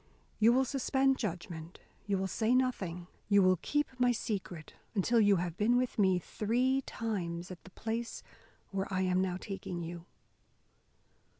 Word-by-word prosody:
You 220 Hz, +2 st, +6 dB
will 260 Hz, +2 st, +3 dB
suspend 270 Hz, 0 st, +1 dB
judgment, 170 Hz, -5 st, -5 dB, 0.3 s
you 200 Hz, -1 st, +1 dB
will 190 Hz, -, -1 dB
say 220 Hz, +5 st, +1 dB
nothing, 190 Hz, -10 st, 0 dB, 0.2 s
you 200 Hz, -1 st, +6 dB
will 185 Hz, 0 st, +5 dB
keep 295 Hz, 0 st, +1 dB
my 245 Hz, 0 st, +4 dB
secret, 195 Hz, -8 st, -4 dB, 0.2 s
until 230 Hz, +4 st, +3 dB
you 205 Hz, -1 st, +5 dB
have 175 Hz, -1 st, -2 dB
been 230 Hz, +3 st, +3 dB
with 250 Hz, -3 st, -1 dB
me 190 Hz, -2 st, +4 dB
three 245 Hz, +9 st, 0 dB
times 180 Hz, -6 st, -3 dB
at 180 Hz, -, -10 dB
the -, -, -11 dB
place 225 Hz, +4 st, -4 dB, 0.5 s
where 195 Hz, 0 st, -2 dB
I 190 Hz, 0 st, 0 dB
am 185 Hz, 0 st, +2 dB
now 185 Hz, -1 st, -1 dB
taking 185 Hz, -3 st, -5 dB
you." 170 Hz, +1 st, -7 dB
200 Hz, 160 wpm, -32 LUFS, 180-235 Hz, 0.5 s, You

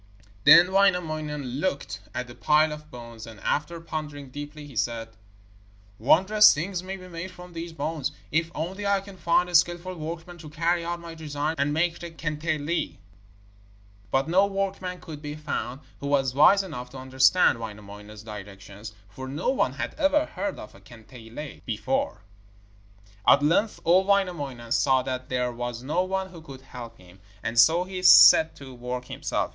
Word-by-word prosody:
Then 180 Hz, +2 st, +8 dB
Wainamoinen 155 Hz, -7 st, +1 dB
looked 185 Hz, -5 st, -2 dB, 0.2 s
at 125 Hz, -, -2 dB
the 120 Hz, -, -12 dB
pile 150 Hz, +5 st, +3 dB
of 150 Hz, 0 st, -9 dB
bones, 115 Hz, -3 st, -10 dB
and 110 Hz, -3 st, -11 dB
after 165 Hz, +3 st, -1 dB
pondering 150 Hz, -4 st, -6 dB
deeply 145 Hz, +2 st, -8 dB
he 140 Hz, -4 st, -13 dB
said: 115 Hz, 0 st, -2 dB, 0.9 s
'Wondrous 190 Hz, -, +6 dB
things 175 Hz, +4 st, -3 dB
may 190 Hz, +1 st, -6 dB
be 185 Hz, -1 st, -12 dB
made 170 Hz, +1 st, -6 dB
from 180 Hz, -1 st, -13 dB
these 165 Hz, 0 st, -6 dB
bones, 150 Hz, -2 st, -3 dB, 0.2 s
if 165 Hz, +2 st, +1 dB
only 185 Hz, +6 st, -4 dB
I 200 Hz, 0 st, +3 dB
can 195 Hz, 0 st, -12 dB
find 180 Hz, 0 st, +2 dB
a 180 Hz, -, -9 dB
skilful 175 Hz, +2 st, +2 dB
workman 170 Hz, +1 st, -7 dB
to 155 Hz, -2 st, -10 dB
carry 170 Hz, +3 st, 0 dB
out 170 Hz, +1 st, -3 dB
my 170 Hz, -1 st, -9 dB
designs 155 Hz, 0 st, -3 dB
and 140 Hz, +1 st, +1 dB
make 170 Hz, +2 st, 0 dB
the 170 Hz, -, -7 dB
kantele.' 155 Hz, 0 st, -3 dB, 1.1 s
But 135 Hz, +6 st, +1 dB
no 190 Hz, +4 st, +4 dB
workman 195 Hz, -2 st, -3 dB
could 155 Hz, -3 st, -9 dB
be 150 Hz, -1 st, -6 dB
found 145 Hz, -3 st, -4 dB, 0.2 s
who 140 Hz, -, -5 dB
was 135 Hz, -2 st, +1 dB
wise 195 Hz, +8 st, +6 dB
enough 125 Hz, -9 st, -7 dB
to 135 Hz, -, -11 dB
understand 130 Hz, +3 st, +3 dB
Wainamoinen's 105 Hz, -1 st, -9 dB
directions, 100 Hz, 0 st, -10 dB
for 130 Hz, +6 st, -9 dB
no 145 Hz, +5 st, -2 dB
one 265 Hz, -, +1 dB
had -, -, -4 dB
ever 295 Hz, +1 st, +3 dB
heard 200 Hz, -6 st, -4 dB
of 105 Hz, -, -10 dB
a 100 Hz, -, -17 dB
kantele 120 Hz, +5 st, -11 dB
before. 265 Hz, -, -2 dB, 1.0 s
At 140 Hz, -, +6 dB
length 190 Hz, +8 st, +2 dB
old 185 Hz, +3 st, +4 dB
Wainamoinen 145 Hz, -12 st, -1 dB
saw 130 Hz, 0 st, +3 dB
that 130 Hz, 0 st, -5 dB
there 125 Hz, -1 st, 0 dB
was 120 Hz, 0 st, -5 dB
no 155 Hz, +7 st, 0 dB
one 190 Hz, 0 st, -2 dB
who 170 Hz, -3 st, -11 dB
could 135 Hz, -4 st, -11 dB
help 120 Hz, -3 st, -10 dB
him, 90 Hz, +1 st, -18 dB, 0.2 s
and 115 Hz, +1 st, 0 dB
so 165 Hz, +7 st, +6 dB
he 185 Hz, 0 st, -6 dB
set 160 Hz, -3 st, +8 dB
to 135 Hz, -2 st, -11 dB
work 125 Hz, +1 st, -5 dB
himself. -, -, -3 dB
155 Hz, 170 wpm, -26 LUFS, 125-175 Hz, 1.1 s, Then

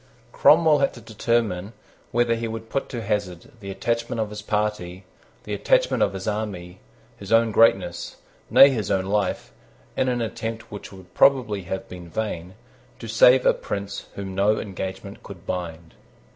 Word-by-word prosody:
Cromwell 155 Hz, -1 st, +5 dB
had 140 Hz, -, +1 dB
to -, -, -10 dB
determine 110 Hz, -3 st, -1 dB, 0.4 s
whether 120 Hz, 0 st, +2 dB
he 115 Hz, 0 st, -2 dB
would 115 Hz, 0 st, -7 dB
put 135 Hz, -, -2 dB
to 120 Hz, -3 st, -5 dB
hazard 100 Hz, -5 st, -3 dB
the 100 Hz, -3 st, -8 dB
attachment 115 Hz, +3 st, -2 dB
of 110 Hz, -1 st, -2 dB
his 105 Hz, 0 st, -6 dB
party, 105 Hz, -4 st, -2 dB, 0.4 s
the -, -, -5 dB
attachment -, -, +2 dB
of -, -, +2 dB
his 95 Hz, +1 st, -6 dB
army, 100 Hz, -4 st, -4 dB, 0.4 s
his 100 Hz, -2 st, -10 dB
own 115 Hz, 0 st, +4 dB
greatness, 95 Hz, -6 st, +2 dB, 0.3 s
nay 140 Hz, +1 st, +8 dB
his 110 Hz, -7 st, -2 dB
own 95 Hz, -1 st, +1 dB
life, 100 Hz, -1 st, -1 dB, 0.4 s
in 130 Hz, -, +1 dB
an 125 Hz, -1 st, -1 dB
attempt 115 Hz, 0 st, -5 dB
which 105 Hz, -, -8 dB
would 95 Hz, -2 st, -14 dB
probably 110 Hz, -9 st, +3 dB
have 95 Hz, +2 st, -5 dB
been 90 Hz, -2 st, -10 dB
vain, 95 Hz, -2 st, -4 dB, 0.4 s
to 115 Hz, -, -9 dB
save 125 Hz, +3 st, +5 dB
a -, -, +6 dB
prince 100 Hz, 0 st, -5 dB
whom 95 Hz, -1 st, -6 dB
no 100 Hz, +3 st, +2 dB
engagement 95 Hz, 0 st, -6 dB
could 95 Hz, -4 st, -12 dB
bind. 85 Hz, -2 st, -5 dB
105 Hz, 165 wpm, -24 LUFS, 95-115 Hz, 0.4 s, nay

